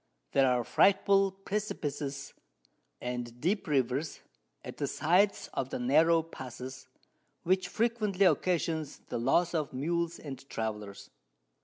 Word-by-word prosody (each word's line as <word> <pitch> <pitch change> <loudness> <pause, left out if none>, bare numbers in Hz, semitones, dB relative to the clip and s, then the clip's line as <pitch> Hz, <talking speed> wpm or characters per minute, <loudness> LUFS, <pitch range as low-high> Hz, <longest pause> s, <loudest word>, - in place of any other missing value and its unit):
There 135 -1 +4
are 125 -1 +2
frightful 195 - +4
Precipices, 150 -9 -4 0.7
and 120 -1 -5
deep 190 - 0
Rivers, 140 +1 0 0.4
at - - -8
the - - -1
sides 180 +7 +2
of 130 - -2
the - - -3
narrow 160 +6 +4
Passes, 130 -4 -9 0.6
which 185 +2 +2
frequently 215 -4 +1
occasions 160 -3 +1
the - - -2
Loss 165 +9 +2
of 155 -5 -1
Mules 170 +5 -1
and 135 -4 -8
Travellers. 105 -3 -5
155 Hz, 120 wpm, -30 LUFS, 130-180 Hz, 0.7 s, There